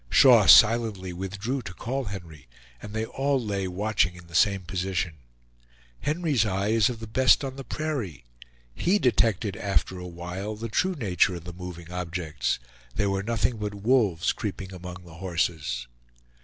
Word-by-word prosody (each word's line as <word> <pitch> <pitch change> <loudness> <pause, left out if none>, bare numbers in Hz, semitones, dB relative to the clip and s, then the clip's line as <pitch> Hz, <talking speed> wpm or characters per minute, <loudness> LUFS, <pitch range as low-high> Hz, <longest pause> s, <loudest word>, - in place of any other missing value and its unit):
Shaw - - +7
silently 105 -5 +6
withdrew 100 +9 -3
to 95 -5 -8
call 130 +3 -3
Henry, 85 - -8 0.3
and 105 - -8
they 110 +1 -2
all 135 +3 0
lay 100 -5 -2
watching 95 -1 0
in 90 -1 -13
the 85 - -17
same 100 +2 +3
position. 90 -2 -2 0.8
Henry's 150 - +1
eye 100 -1 -1
is 110 +1 +4
of 120 -3 -5
the - - -5
best 130 +6 +4
on 135 -1 -4
the 135 - -7
prairie. 130 - -4 0.5
He 180 - +2
detected 110 - +2
after 95 -2 -1
a 90 - -7
while 90 +4 -5
the 115 +2 -5
true 185 - +1
nature 95 - +2
of 85 - -8
the 90 +1 -8
moving 90 -1 -8
objects; 85 -7 -2 0.4
they 105 - +1
were 95 -1 0
nothing 115 +2 0
but 105 -1 -4
wolves 100 -5 +2
creeping 95 -2 -5
among 90 0 -9
the 85 - -13
horses. 80 -9 -1
100 Hz, 165 wpm, -26 LUFS, 90-115 Hz, 0.8 s, Shaw